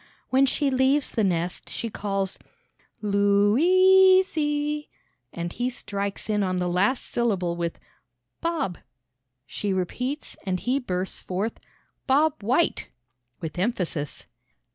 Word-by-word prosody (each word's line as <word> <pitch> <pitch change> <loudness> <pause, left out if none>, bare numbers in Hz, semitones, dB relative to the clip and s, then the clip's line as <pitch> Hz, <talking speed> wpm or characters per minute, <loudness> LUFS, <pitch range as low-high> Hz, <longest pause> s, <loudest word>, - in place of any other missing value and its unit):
When 270 +1 +5
she 275 +1 +1
leaves 265 +2 +2
the 220 - 0
nest, 175 -2 -1
she 230 - -4
calls 195 -2 -2 0.6
"Lou 200 0 +3
is 375 +4 +6
e!" 295 0 -1 0.4
and 170 0 -5
he 245 +1 -1
strikes 200 -5 -4
in 210 -1 +1
on 185 -2 0
the 180 0 0
last 195 +9 +1
syllable 190 -8 0
with 170 -1 -3 0.6
"Bob;" 330 - -1 0.7
she 200 +8 -3
repeats, 250 - -3
and 185 -2 -1
he 255 +7 0
bursts 185 -6 -4
forth 195 +5 -3 0.5
"Bob 295 +2 +3
White!" 255 +11 +1 0.5
with 165 +1 -5
emphasis. 180 - -2
210 Hz, 120 wpm, -25 LUFS, 185-280 Hz, 0.7 s, is